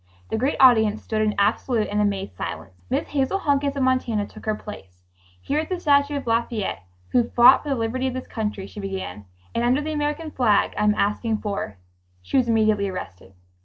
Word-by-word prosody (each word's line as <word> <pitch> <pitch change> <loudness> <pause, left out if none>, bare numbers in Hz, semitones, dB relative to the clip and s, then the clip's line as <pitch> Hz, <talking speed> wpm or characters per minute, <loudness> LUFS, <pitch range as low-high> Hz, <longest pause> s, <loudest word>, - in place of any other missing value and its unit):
The - - -1
great 265 +5 +1
audience 220 -5 +5
stood 220 -1 -1
in 215 -1 +1
absolute 215 +3 +1
and 210 +1 0
amazed 195 - -1
silence. 90 0 -7
Miss - - -1
Hazel 280 +6 0
Hunkins 285 -5 0
of 275 - 0
Montana 250 -5 +1
took - - -13
her 215 - +1
place. 95 - -11 0.4
"Here 290 - -1
at 315 - -3
the 365 -1 -2
statue 285 -2 +3
of 280 - -6
Lafayette, 230 - -1 0.3
who 240 -1 +2
fought 245 +2 +7
for 295 - -7
the 275 - +1
liberty 245 +3 -1
of 255 - -3
this 260 - -5
country," 210 -3 -4
she 205 - -10
began, 190 - -5 0.3
"and 235 - 0
under 250 +3 +3
the 310 +1 -3
American 300 +1 -2
flag, 225 -7 +2
I 210 - 0
am 210 0 +3
asking 215 +2 0
for.. 200 - -4 0.2
." 90 0 -39
She - - -5
was 255 -3 +3
immediately 215 -3 +2
arrested. 95 - -8
225 Hz, 205 wpm, -23 LUFS, 205-265 Hz, 0.4 s, fought